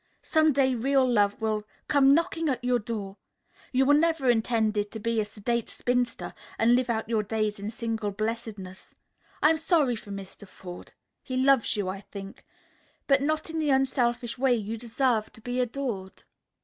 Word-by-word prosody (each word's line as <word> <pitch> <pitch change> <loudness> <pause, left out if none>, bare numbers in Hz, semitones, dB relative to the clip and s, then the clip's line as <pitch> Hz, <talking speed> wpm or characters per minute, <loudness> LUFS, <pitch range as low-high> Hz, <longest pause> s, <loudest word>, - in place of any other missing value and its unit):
Some 315 -1 +3
day 265 -1 +2
real 265 +2 +2
love 205 -4 +2
will 215 -1 -1 0.2
come 280 -1 +5
knocking 330 -1 0
at 255 -2 -2
your 250 -1 +2
door. 205 -3 -5 0.5
You 265 +1 +3
were 290 - +5
never 305 -4 +3
intended 220 -3 +1
to 220 - -7
be 230 +1 0
a - - -2
sedate 225 +3 -2
spinster 245 -1 -1 0.2
and 230 +2 +4
live 250 0 +2
out 225 -1 -1
your 225 -2 +1
days 210 0 -2
in 205 +1 -4
single 225 -2 -3
blessedness. 210 -3 -5 0.5
I'm 315 +1 +5
sorry 315 -6 +2
for 210 - -11
Mr. 200 0 -8
Forde. 180 -1 -11 0.3
He 255 -1 -4
loves 265 -3 +3
you, 205 -3 -1
I 190 +1 -3
think. 195 -1 -10 0.6
But 275 -1 +4
not 310 +2 -1
in 325 - -2
the 305 -2 0
unselfish 245 -3 +1
way 260 -2 +4
you 220 0 -3
deserve 230 -1 0
to 225 - -15
be 245 +2 -3
adored." 240 -6 -3
235 Hz, 175 wpm, -27 LUFS, 215-265 Hz, 0.6 s, come